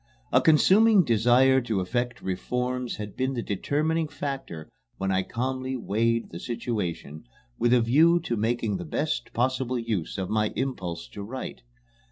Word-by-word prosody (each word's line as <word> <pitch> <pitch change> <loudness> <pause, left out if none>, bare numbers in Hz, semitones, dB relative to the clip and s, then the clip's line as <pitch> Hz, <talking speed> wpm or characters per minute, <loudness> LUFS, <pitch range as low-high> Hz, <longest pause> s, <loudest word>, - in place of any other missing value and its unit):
A - - +5
consuming 195 +6 +5
desire 125 +2 +4
to 115 -5 -1
effect 120 +6 -2
reforms 125 +6 -2
had 105 -2 -7
been 130 +1 -1
the 120 - -2
determining 155 - 0
factor 135 - -5 0.3
when 95 0 -1
I 95 0 +2
calmly 130 +5 -3
weighed 115 +1 0
the 85 - -7
situation 100 - -4 0.3
with 120 - +2
a 125 -1 +5
view 160 +9 +4
to 120 -7 -2
making 110 -2 0
the 90 - -6
best 150 - -2
possible 130 +1 0
use 110 -8 -3
of 95 -1 -2
my 110 +1 0
impulse 90 - -3
to 100 - -8
write. 125 +6 -6
120 Hz, 155 wpm, -26 LUFS, 105-130 Hz, 0.3 s, A